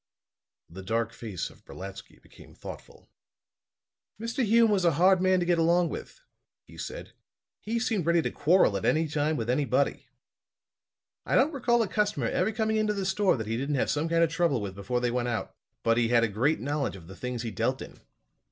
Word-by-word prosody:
The 90 +4 -10
dark 115 +4 -1
face 105 -8 -5
of - - -21
Brolatsky 95 +1 -10
became - - -17
thoughtful. - - -11 1.1
"Mr. 235 +4 -2
Hume 230 0 +4
was 195 -3 +2
a 170 -2 +4
hard 185 +4 +4
man 185 0 +3
to 175 - 0
get 175 -1 +2
along 170 +1 +3
with," - - -8 0.4
he - - -16
said. - - -7 0.5
"He 230 +2 -3
seemed 220 -7 -1
ready 170 0 +4
to - - -2
quarrel 165 - +3
at 95 - -6
any 160 +1 +2
time 150 +1 0
with 115 - -3
anybody. 130 +1 0 1.2
I - - -1
don't 295 +5 +3
recall 240 -3 +2
a - - -2
customer 210 +1 0
ever 220 - 0
coming 220 0 0
into 215 -1 +1
the 195 -1 -2
store 190 -3 +2
that 110 - -4
he 110 +1 -2
didn't 140 +3 -1
have 135 - +1
some 150 +3 -1
kind 165 0 +3
of 165 - +1
trouble 165 -6 +1
with 100 -2 -5
before 115 +6 -2
they 120 -1 0
went 120 0 -1
out. 120 -2 -3 0.3
But 115 0 +3
he 120 -1 +3
had 120 0 +3
a - - +3
great 120 +10 +1
knowledge 140 -3 -2
of 90 -4 -12
the 95 +3 -11
things 125 +2 -4
he 115 - -4
dealt 100 - -1
in. - - -10
150 Hz, 205 wpm, -28 LUFS, 115-190 Hz, 1.2 s, Hume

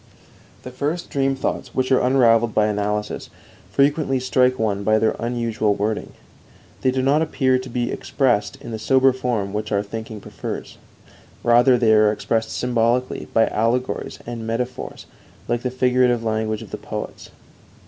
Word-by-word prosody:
The 125 - -8
first 150 +7 -3
dream 135 -1 +1
thoughts 135 -1 -3
which 130 0 0
are 130 - +5
unravelled 120 -3 +3
by 105 - +4
analysis 105 0 -2 0.4
frequently 140 -1 +2
strike 130 0 +2
one 105 -3 -1
by 110 +1 +3
their 110 0 +1
unusual 115 -3 0
wording. 105 +2 -2 0.7
They 130 - +2
do 130 0 0
not 145 +4 +3
appear 130 -5 +1
to 130 0 -8
be 120 0 -2
expressed 120 -7 0
in - - -8
the 110 - -4
sober 130 +2 +4
form 120 -6 -2
which 105 0 -3
our 100 -1 +1
thinking 110 +1 -7
prefers; - - -7 0.6
rather 120 +2 +5
are - - +2
they 110 -3 +4
expressed 110 +1 -1
symbolically 125 +1 0
by 115 - +4
allegories 120 +4 -1
and 115 -1 -6
metaphors 125 +3 -4 0.4
like 120 0 0
the 125 - -1
figurative 125 -1 +2
language 110 0 -1
of 105 - -13
the - - -4
poets. - - -7
120 Hz, 160 wpm, -22 LUFS, 110-130 Hz, 0.7 s, are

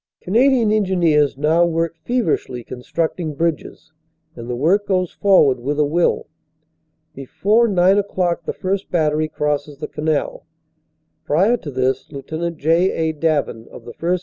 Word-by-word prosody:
Canadian 235 +2 +2
Engineers 170 -9 +2
now 155 +4 +3
work 165 -1 -1
feverishly 165 - -2
constructing 155 +6 -4
bridges, 165 0 -3 0.4
and 120 0 -9
the 125 - -2
work 180 +11 +1
goes 185 -3 0
forward 150 -10 +3
with 140 +4 -3
a 150 - +3
will. 165 +4 +1 0.9
Before 195 - +1
nine 190 0 +3
o - - +1
clock 175 -4 -2
the - - -2
first 195 +1 -3
battery 155 -2 +1
crosses 150 -1 -3
the 150 +1 -5
canal. 150 -1 -3 0.8
Prior 195 +11 +2
to 155 - -8
this, 130 0 -1
Lt. 160 +4 -5
J. 165 +5 +2 0.2
A. - - -11
Davin, 150 -7 -1
of - - -13
the 120 - -9
1st. 180 +2 -1
165 Hz, 150 wpm, -19 LUFS, 145-185 Hz, 0.9 s, now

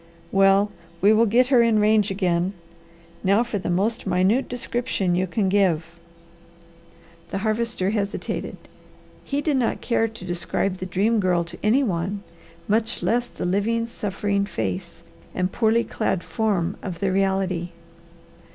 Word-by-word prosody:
"Well 195 +1 +4 0.3
we 205 +4 +5
will 225 +1 +4
get 245 +4 +3
her 255 -4 +6
in 230 -2 +3
range 210 -1 +3
again. 185 -1 0 0.7
Now 200 +5 +4
for 235 -4 -3
the 180 - -4
most 210 +6 0
minute 190 +8 +2
description 240 -6 -1
you 185 +2 +1
can 195 +3 0
give." 185 -5 +2 1.4
The - - -3
Harvester 215 -3 0
hesitated. 205 -2 -3 0.7
He 285 +1 -2
did 295 -2 +1
not 245 -3 0
care 225 -2 +1
to 220 -4 -10
describe 180 +2 -1
the 185 - -5
Dream 210 +5 +1
Girl 180 -3 +2
to 170 - -8
any 235 +7 +3
one, 195 -1 -2 0.4
much 220 +2 0
less 240 +1 +1
the - - -6
living, 210 +5 +1
suffering 200 -3 -2
face 95 - -4 0.3
and 185 0 0
poorly 230 0 +2
clad 190 -5 -2
form 200 -5 -1
of 180 -4 -6
the 195 -2 0
reality. 190 -2 0
200 Hz, 145 wpm, -23 LUFS, 185-225 Hz, 1.4 s, her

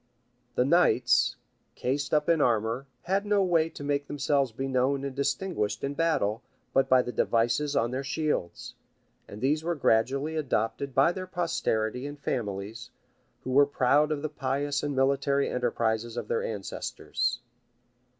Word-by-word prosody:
The 125 - +3
knights, 170 -3 +3 0.4
cased 140 +2 -2
up 150 -1 +2
in 165 -3 +3
armor, 115 +2 +1 0.2
had 195 +3 0
no 205 -1 +2
way 165 -3 +2
to 160 - -9
make 145 0 -1
themselves 145 -3 0
be 135 +5 -4
known 135 +1 +1
and 135 -2 -5
distinguished 140 - -1
in 140 - -1
battle, 140 -9 0 0.3
but 135 - +3
by 130 -1 +5
the 125 - -4
devices 120 +6 +1
on 120 -1 +1
their 130 +2 -3
shields; 140 - -2 0.5
and 105 - -10
these 150 +4 +1
were 170 +1 -1
gradually 140 +4 +1
adopted 135 -2 -1
by 135 +5 +5
their 185 +1 -6
posterity 130 -9 -1
and 145 0 -8
families, 105 -2 -4 0.5
who 130 - -4
were 140 +2 +5
proud 145 +3 +3
of 150 -1 -2
the - - 0
pious 145 0 -1
and 145 -1 -2
military 140 +1 +2
enterprises 115 -2 -1
of 115 -3 -4
their - - +1
ancestors. 120 +3 -3
135 Hz, 155 wpm, -28 LUFS, 120-150 Hz, 0.5 s, by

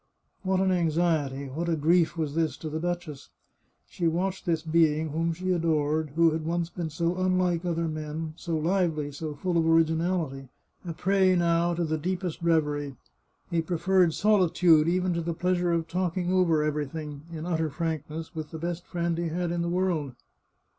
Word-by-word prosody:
What 190 -1 +1
an 190 0 +2
anxiety, 160 -5 +1
what 160 +6 -3
a 165 - +2
grief 165 +2 +2
was 155 -3 -2
this 160 -1 0
to 155 - -6
the 155 - -2
duchess! 175 -4 -4 0.6
She 170 - -2
watched 185 +4 -1
this 165 -2 +1
being 160 -1 +2
whom 165 +3 0
she 185 +3 -2
adored, 155 -3 0
who 165 0 +5
had 160 0 -2
once 170 +1 -2
been 170 -3 -4
so 170 +3 -1
unlike 185 -2 +1
other 170 -1 0
men, 155 0 -4
so 165 -1 -3
lively, 160 -3 0
so 150 +1 -5
full 175 +3 0
of 165 - +1
originality, 165 -4 +1 0.3
a 170 -3 -5
prey 190 +1 +3
now 170 0 +2
to 175 - -1
the 155 -1 -1
deepest 180 0 -3
reverie. 150 -4 0 0.6
He 170 -1 +2
preferred 175 0 +2
solitude 175 -6 +4
even 180 +1 +1
to 170 - -1
the 170 0 -3
pleasure 180 0 +1
of 165 -1 0
talking 180 +1 -1
over 170 -5 +3
everything, 150 0 -3
in 160 -1 -6
utter 160 -3 0
frankness, 160 +1 -4
with 155 -2 -5
the 160 - -7
best 170 +1 -4
friend 170 -1 -1
he 170 - -1
had 170 +1 -2
in 175 0 -1
the 170 - -1
world. 170 -7 -1
165 Hz, 180 wpm, -27 LUFS, 155-175 Hz, 0.6 s, who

